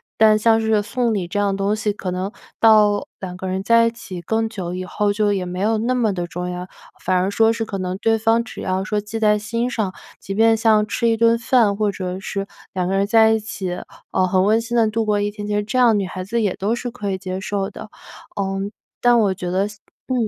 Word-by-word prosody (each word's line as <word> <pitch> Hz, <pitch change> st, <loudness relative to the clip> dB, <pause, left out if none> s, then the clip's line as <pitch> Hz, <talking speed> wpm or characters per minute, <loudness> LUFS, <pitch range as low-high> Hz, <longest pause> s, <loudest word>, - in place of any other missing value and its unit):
但 215 Hz, -1 st, +5 dB
像 225 Hz, +1 st, +4 dB
是 220 Hz, -1 st, +2 dB
送 235 Hz, +2 st, -1 dB
礼 190 Hz, -4 st, -2 dB
这 190 Hz, -, -4 dB
样 200 Hz, -1 st, +1 dB
东 200 Hz, +2 st, +1 dB
西， 215 Hz, -1 st, -1 dB
可 200 Hz, -2 st, -5 dB
能 185 Hz, +3 st, -3 dB, 0.3 s
到 210 Hz, -2 st, +4 dB
2 180 Hz, -2 st, -6 dB
个 185 Hz, -, -7 dB
人 190 Hz, +1 st, -2 dB
在 230 Hz, +3 st, +4 dB
一 -, -, -1 dB
起 190 Hz, -6 st, -8 dB
更 220 Hz, +6 st, 0 dB
久 185 Hz, -6 st, -5 dB
以 185 Hz, 0 st, -4 dB
后， 205 Hz, +2 st, 0 dB
就 205 Hz, 0 st, +1 dB
也 190 Hz, -2 st, -1 dB
没 180 Hz, +1 st, -5 dB
有 220 Hz, +3 st, +1 dB
那 240 Hz, +3 st, 0 dB
么 225 Hz, -5 st, +1 dB
地 175 Hz, -2 st, -3 dB
重 180 Hz, +1 st, -5 dB
要。 180 Hz, 0 st, -5 dB, 0.4 s
反 185 Hz, +1 st, +2 dB
而 185 Hz, +2 st, +1 dB
说 225 Hz, +2 st, +3 dB
是 225 Hz, 0 st, -2 dB
可 205 Hz, -2 st, -5 dB
能 185 Hz, 0 st, -3 dB
对 225 Hz, +2 st, +2 dB
方 225 Hz, +1 st, +2 dB
只 235 Hz, -, -8 dB
要 185 Hz, 0 st, -1 dB
说 210 Hz, 0 st, -1 dB
记 215 Hz, +2 st, -5 dB
在 210 Hz, -1 st, +4 dB
心 230 Hz, +4 st, -2 dB
上， 215 Hz, -6 st, -2 dB, 0.3 s
即 195 Hz, -, -5 dB
便 225 Hz, +2 st, +4 dB
像 215 Hz, -1 st, +3 dB
吃 235 Hz, -, 0 dB
一 225 Hz, -, +1 dB
顿 230 Hz, +1 st, +4 dB
饭， 230 Hz, -3 st, +3 dB
或 210 Hz, 0 st, 0 dB
者 185 Hz, -1 st, -4 dB
是 195 Hz, 0 st, -4 dB, 0.3 s
2 180 Hz, -1 st, -1 dB
个 195 Hz, -, 0 dB
人 195 Hz, +1 st, +2 dB
在 220 Hz, +1 st, +5 dB
一 220 Hz, -, +2 dB
起， 205 Hz, -3 st, -5 dB, 0.4 s
呃， 185 Hz, -, +2 dB
很 185 Hz, 0 st, +2 dB
温 220 Hz, +2 st, +3 dB
馨 240 Hz, +1 st, -2 dB
地 225 Hz, -2 st, +4 dB
度 225 Hz, +1 st, 0 dB
过 210 Hz, -1 st, +1 dB
一 205 Hz, 0 st, 0 dB
天， 205 Hz, 0 st, -7 dB
其 210 Hz, -, -2 dB
实 210 Hz, -, +2 dB
这 215 Hz, +5 st, -3 dB
样 235 Hz, -4 st, +5 dB
女 195 Hz, -, -1 dB
孩 185 Hz, 0 st, -6 dB
子 230 Hz, +5 st, -1 dB
也 200 Hz, -4 st, +1 dB
都 205 Hz, +4 st, -1 dB
是 240 Hz, +1 st, -3 dB
可 210 Hz, -4 st, -4 dB
以 190 Hz, -, -1 dB
接 185 Hz, 0 st, -5 dB
受 195 Hz, 0 st, -2 dB
的， -, -, -10 dB, 0.5 s
嗯， 195 Hz, +1 st, -2 dB, 1.4 s
但 255 Hz, -, 0 dB
我 240 Hz, -, +2 dB
210 Hz, 255 characters per minute, -21 LUFS, 190-225 Hz, 1.4 s, 但